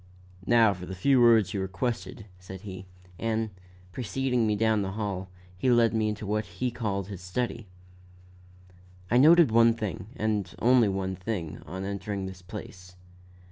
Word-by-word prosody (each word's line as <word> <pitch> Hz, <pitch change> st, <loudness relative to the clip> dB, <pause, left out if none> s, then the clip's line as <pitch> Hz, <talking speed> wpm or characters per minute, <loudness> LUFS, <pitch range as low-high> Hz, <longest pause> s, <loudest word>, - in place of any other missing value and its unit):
"Now 115 Hz, -3 st, +5 dB
for 90 Hz, -1 st, -9 dB
the 95 Hz, -, -6 dB
few 130 Hz, +6 st, +3 dB
words 115 Hz, -4 st, +5 dB
you 100 Hz, -, -1 dB
requested," 110 Hz, +4 st, -4 dB
said 95 Hz, 0 st, -10 dB
he; 95 Hz, -2 st, -9 dB, 0.3 s
and, 110 Hz, -1 st, -1 dB, 0.4 s
preceding 125 Hz, +1 st, -1 dB
me 105 Hz, -, +1 dB
down 110 Hz, 0 st, +2 dB
the 95 Hz, -1 st, -3 dB
hall, 100 Hz, -3 st, -4 dB, 0.3 s
he 125 Hz, +8 st, 0 dB
led 120 Hz, -2 st, +4 dB
me 110 Hz, -1 st, +1 dB
into 105 Hz, 0 st, -5 dB
what 105 Hz, +1 st, -1 dB
he 125 Hz, +5 st, -1 dB
called 100 Hz, -5 st, -2 dB
his 95 Hz, -3 st, -7 dB
study. 115 Hz, +4 st, -3 dB, 1.4 s
I 120 Hz, -, +5 dB
noted 160 Hz, -1 st, +7 dB
one 115 Hz, 0 st, +5 dB
thing, 100 Hz, -4 st, -5 dB
and 105 Hz, -4 st, -2 dB
only 120 Hz, -3 st, +4 dB
one 95 Hz, -1 st, -2 dB
thing, 90 Hz, -4 st, -5 dB
on 95 Hz, +5 st, -5 dB
entering 100 Hz, 0 st, -4 dB
this 95 Hz, -1 st, -8 dB
place. 90 Hz, 0 st, -10 dB
105 Hz, 160 wpm, -27 LUFS, 95-115 Hz, 1.4 s, noted